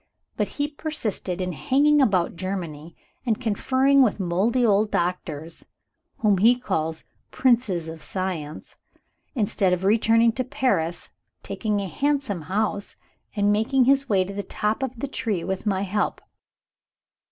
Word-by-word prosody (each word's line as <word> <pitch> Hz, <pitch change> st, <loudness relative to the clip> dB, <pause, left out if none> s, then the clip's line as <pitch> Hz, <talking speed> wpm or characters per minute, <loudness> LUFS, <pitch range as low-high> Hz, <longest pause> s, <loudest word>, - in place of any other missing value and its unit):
But -, -, 0 dB
he 290 Hz, 0 st, +1 dB
persisted 285 Hz, -, -3 dB
in 180 Hz, 0 st, -2 dB
hanging 290 Hz, -, +3 dB
about 185 Hz, -9 st, +2 dB
Germany, 170 Hz, -4 st, -5 dB, 0.3 s
and 230 Hz, -3 st, 0 dB
conferring 260 Hz, +4 st, +3 dB
with 225 Hz, -5 st, +2 dB
moldy 200 Hz, +8 st, +1 dB
old 210 Hz, 0 st, +3 dB
doctors 170 Hz, -3 st, -2 dB, 0.5 s
(whom 205 Hz, -4 st, +2 dB
he 230 Hz, +5 st, +6 dB
calls 160 Hz, -9 st, -2 dB, 0.3 s
"Princes 230 Hz, -10 st, +1 dB
of 160 Hz, -1 st, -8 dB
Science"!) 175 Hz, -6 st, -5 dB, 0.6 s
instead 200 Hz, -5 st, +1 dB
of 180 Hz, +1 st, -1 dB
returning 225 Hz, +3 st, +4 dB
to 255 Hz, +3 st, -2 dB
Paris, 200 Hz, -, -1 dB, 0.3 s
taking 210 Hz, -2 st, -2 dB
a 200 Hz, -, -3 dB
handsome 275 Hz, -, -1 dB
house, 205 Hz, 0 st, -1 dB, 0.4 s
and 205 Hz, -1 st, +2 dB
making 235 Hz, +5 st, +2 dB
his 275 Hz, +1 st, +3 dB
way 195 Hz, -3 st, +3 dB
to 195 Hz, +2 st, -7 dB
the 200 Hz, -, -3 dB
top 210 Hz, +4 st, -2 dB
of 260 Hz, -3 st, -4 dB
the 280 Hz, -, -2 dB
tree 220 Hz, -10 st, -2 dB
with 190 Hz, +2 st, -3 dB
my 195 Hz, -1 st, +1 dB
help. 205 Hz, +2 st, -1 dB
205 Hz, 140 wpm, -24 LUFS, 185-250 Hz, 0.6 s, he